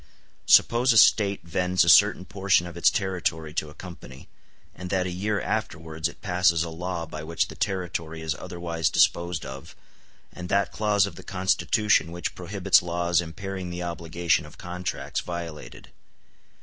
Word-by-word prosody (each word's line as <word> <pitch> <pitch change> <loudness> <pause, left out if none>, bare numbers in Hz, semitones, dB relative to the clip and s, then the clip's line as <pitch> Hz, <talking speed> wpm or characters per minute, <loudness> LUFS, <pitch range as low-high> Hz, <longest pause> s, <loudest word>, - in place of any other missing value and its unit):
Suppose 120 +2 +5
a - - +2
State 100 -2 +4
vends 90 +2 +1
a - - -2
certain 95 +2 +6
portion 95 -2 +1
of 85 -1 -9
its 85 0 +4
territory 85 -4 -2
to 75 -2 -2
a 75 - -15
company, 85 -7 -11 0.4
and 90 0 -8
that 95 -1 0
a 90 - -3
year 100 +3 -1
afterwards 80 -7 -3
it - - -13
passes 90 -2 +2
a 85 - -6
law 85 0 -4
by 75 -1 -8
which 80 +1 -1
the - - -9
territory 85 -4 -3
is 80 -2 -1
otherwise 85 +1 -3
disposed 85 -2 +1
of, 65 +1 -9 0.6
and 90 0 -8
that 100 -2 +1
clause 105 -2 +2
of 95 -5 -8
the - - -10
Constitution 95 -1 +1
which 85 0 -4
prohibits 95 +1 +2
laws 85 0 0
impairing 95 +2 -6
the 90 0 -5
obligation 85 -1 -1
of 75 - -16
contracts 90 0 -4
violated. 85 -7 -8
90 Hz, 160 wpm, -25 LUFS, 85-95 Hz, 0.6 s, certain